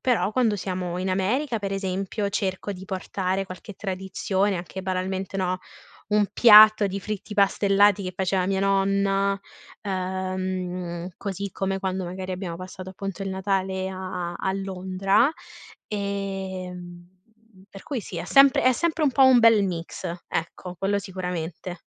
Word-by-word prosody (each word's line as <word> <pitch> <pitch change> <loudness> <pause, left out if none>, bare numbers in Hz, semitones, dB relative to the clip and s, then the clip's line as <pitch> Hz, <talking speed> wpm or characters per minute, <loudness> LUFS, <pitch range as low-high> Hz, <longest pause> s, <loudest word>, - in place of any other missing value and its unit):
però 245 -5 +1
quando 225 -2 +2
siamo 180 -2 -3
in 185 +1 -1
America, 230 +7 0
per 195 -1 -3
esempio, 195 +2 -2
cerco 195 0 -2
di 190 0 -9
portare 190 0 -2
qualche 185 +2 -10
tradizione, 190 +1 -1
anche 180 +2 -6
banalmente, 190 +1 -2
no, 185 -1 0 0.5
un 210 0 +3
piatto 215 -2 +8
di 195 +1 -4
fritti 210 +1 -5
pastellati 200 0 +4
che 185 0 -4
faceva 185 0 0
mia 195 -1 0
nonna, 195 0 +2 0.4
ehm, 185 -2 -3
così 200 0 -5
come 195 +1 -2
quando, 190 -1 -2
magari, 185 +1 -5
abbiamo 180 -2 -4
passato, 185 +1 -8
appunto, 195 0 -6
il 195 - -3
Natale 190 0 -1
a 185 -2 -4
a - - -9
a 190 - -1
Londra, 195 +4 +1 0.6
ehm, 190 -3 -5 0.5
per 195 - -12
cui, 270 -6 -3
sì, - - -7
è - - -4
sempre 275 -1 +6
è 255 - +6
sempre 330 +2 0
un 280 - +3
po' 270 +1 +4
un 260 -2 +7
bel 225 -3 +6
mix, 170 -3 -5 0.2
ecco, 180 +2 -4
quello 195 +3 0
sicuramente. 180 -2 -5
190 Hz, 150 wpm, -25 LUFS, 185-200 Hz, 0.6 s, piatto